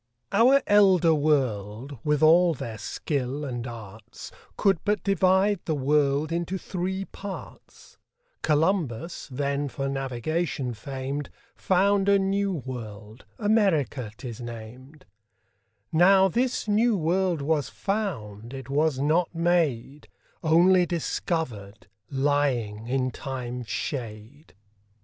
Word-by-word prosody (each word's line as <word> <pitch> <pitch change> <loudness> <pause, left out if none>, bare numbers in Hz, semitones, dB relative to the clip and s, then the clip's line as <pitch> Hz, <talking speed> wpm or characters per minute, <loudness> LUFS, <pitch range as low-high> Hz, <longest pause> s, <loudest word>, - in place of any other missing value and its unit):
Our 250 +7 +5
Elder 190 -5 +5
World, 130 -4 -1
with 150 0 +1
all 170 +1 +6
their 115 -4 -6
Skill 140 +3 -3
and 120 -2 -4
Arts, 110 -2 -10 0.3
Could 195 -5 +3
but 210 +1 0
divide 190 +1 +3
the 160 - 0
World 145 +2 +1
into 170 +2 -2
three 190 +1 -3
Parts: 195 -1 -10 0.4
Columbus, 160 - 0
then 140 +2 -1
for 135 0 -3
Navigation 135 +1 -2
fam'd, 135 +5 -5 0.3
Found 195 +1 +2
a 200 - +6
new 195 +1 0
World, 115 - -7
America 190 - +1
'tis 120 -3 -7
nam'd; 120 +5 -10 0.9
Now 190 +4 +6
this 245 +4 -1
new 215 +1 +3
World 175 -1 0
was 150 -1 0
found, 125 - -4
it 135 0 -8
was 150 0 +2
not 160 +5 +1
made, 155 -6 0 0.4
Onely 175 +3 +5
discovered, 125 - -3 0.2
lying 135 -6 0
in 130 0 0
Time's 125 -3 -6
shade. 120 +2 -6
145 Hz, 110 wpm, -26 LUFS, 125-180 Hz, 0.9 s, all